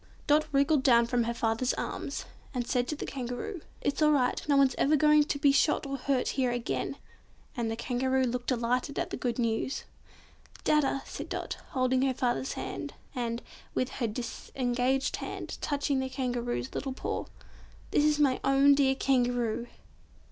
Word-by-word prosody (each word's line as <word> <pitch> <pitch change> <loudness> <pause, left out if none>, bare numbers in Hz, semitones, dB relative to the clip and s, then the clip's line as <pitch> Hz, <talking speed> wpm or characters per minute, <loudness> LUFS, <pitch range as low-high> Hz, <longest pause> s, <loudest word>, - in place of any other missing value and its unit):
Dot 305 +1 +3
wriggled 280 +1 +3
down 235 -3 +5
from 240 0 +1
her 235 - -1
father's 230 +3 0
arms, - - -4 0.3
and 245 -1 -1
said 245 0 0
to 300 - -2
the - - -5
Kangaroo, 270 - -5 0.2
"It's 285 - -1
all 305 - +6
right; 265 -4 +2
no 285 - +5
one's 270 -2 +5
ever 300 +2 +4
going 300 0 +5
to 290 - -1
be 285 0 +4
shot 285 +2 +2
or 275 0 -3
hurt 265 -1 0
here 260 -2 +1
again!" 240 -1 -2 0.6
and 235 -3 -1
the 225 - -2
Kangaroo 260 +2 0
looked 245 0 -2
delighted 250 +3 0
at - - -2
the - - -2
good 240 -2 -2
news. 230 +2 -1 0.8
"Dadda," 275 -2 +2
said - - -7
Dot, - - -4 0.2
holding 255 0 +2
her 265 -1 +1
father's 250 +1 0
hand, - - -5 0.2
and, 235 -1 -3 0.3
with 255 - 0
her 240 - -2
disengaged 250 +3 -1
hand - - -6
touching 285 -1 0
the 265 0 -2
Kangaroo's 245 - -2
little 270 -2 -3
paw. - - -3 0.7
"This 295 - +3
is 300 0 +3
my 275 -4 +3
own 275 +1 +6
dear 270 -1 +3
Kangaroo." 245 -3 +1
260 Hz, 170 wpm, -29 LUFS, 245-280 Hz, 0.8 s, all